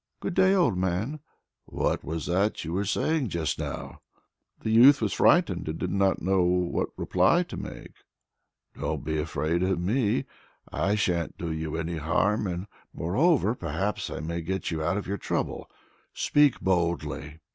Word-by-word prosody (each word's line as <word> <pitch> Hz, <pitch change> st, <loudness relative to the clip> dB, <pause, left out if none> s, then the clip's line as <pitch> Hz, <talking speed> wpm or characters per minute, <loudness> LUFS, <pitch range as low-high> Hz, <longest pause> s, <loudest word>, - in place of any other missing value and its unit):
"Good 195 Hz, -, -3 dB
day, 190 Hz, +1 st, +4 dB
old 145 Hz, -, +2 dB
man!" 95 Hz, -, -1 dB, 0.5 s
"What -, -, -1 dB
was 80 Hz, +2 st, -4 dB
that 95 Hz, +5 st, 0 dB
you 80 Hz, -, -4 dB
were 100 Hz, +3 st, 0 dB
saying 150 Hz, +7 st, 0 dB
just 85 Hz, -3 st, -2 dB
now?" -, -, -5 dB, 0.6 s
The 110 Hz, -, -2 dB
youth 130 Hz, +5 st, +7 dB
was -, -, -1 dB
frightened 155 Hz, -, +3 dB
and 80 Hz, -, -3 dB
did 90 Hz, -, -3 dB
not 100 Hz, -1 st, +1 dB
know 95 Hz, 0 st, +2 dB
what 90 Hz, 0 st, +1 dB
reply -, -, +3 dB
to -, -, -9 dB
make. -, -, -8 dB, 0.8 s
"Don't -, -, -3 dB
be 80 Hz, +1 st, -1 dB
afraid 80 Hz, +2 st, -1 dB
of 95 Hz, -1 st, +1 dB
me! 105 Hz, +5 st, +1 dB, 0.5 s
I 95 Hz, +8 st, +1 dB
sha'n't 90 Hz, -5 st, -1 dB
do 85 Hz, -2 st, -4 dB
you 80 Hz, 0 st, -3 dB
any 80 Hz, +1 st, -3 dB
harm, 100 Hz, +7 st, +1 dB
and 90 Hz, +1 st, -3 dB, 0.3 s
moreover, 120 Hz, -, +2 dB
perhaps 105 Hz, -4 st, -3 dB
I -, -, -5 dB
may 85 Hz, +2 st, -3 dB
get 95 Hz, +3 st, -3 dB
you 80 Hz, -1 st, -2 dB
out 85 Hz, +5 st, 0 dB
of 105 Hz, -, -3 dB
your 100 Hz, +2 st, -3 dB
trouble. -, -, -3 dB, 0.5 s
Speak 145 Hz, -3 st, +3 dB
boldly!" 85 Hz, -4 st, -1 dB
95 Hz, 165 wpm, -27 LUFS, 85-105 Hz, 0.8 s, youth